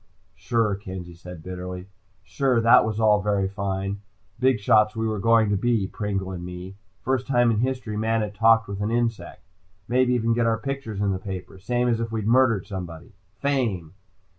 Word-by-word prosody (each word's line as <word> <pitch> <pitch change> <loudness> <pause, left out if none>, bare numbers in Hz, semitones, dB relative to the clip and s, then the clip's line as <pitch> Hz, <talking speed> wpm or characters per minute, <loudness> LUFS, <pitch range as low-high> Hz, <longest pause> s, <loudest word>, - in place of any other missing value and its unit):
"Sure," 105 +3 0
Kenzie 95 -3 -7
said 85 -1 -11
bitterly. 90 0 -6 0.4
"Sure 130 +3 +1
that 115 0 +6
was 110 -1 -2
all 105 -2 +4
very 100 -2 +1
fine. 100 0 -3 0.4
Big 130 -2 +3
shots, 105 +2 +3
we 110 0 -1
were 110 -2 -2
going 115 0 +3
to - - +2
be, 115 0 +1
Pringle 95 -1 -3
and 90 -2 -6
me. 90 +1 -7 0.3
First 130 0 -1
time 120 -3 +3
in 105 - 0
history 125 -3 -2
man 110 +1 0
had 105 -1 -3
talked 115 +2 +4
with 100 0 -5
an 105 - -1
insect. 115 -1 -2 0.4
Maybe 125 +1 +2
even 115 -1 +1
get 115 0 +1
our 115 0 +2
pictures 125 -5 -5
in 100 -1 +1
the 95 - -2
paper, 95 -1 -7
same 120 +5 0
as 115 -2 +1
if 115 -1 -3
we'd 110 -2 -3
murdered 115 -3 +3
somebody. 90 -4 -7 0.3
Fame!" 115 - -1
105 Hz, 190 wpm, -24 LUFS, 95-115 Hz, 0.4 s, that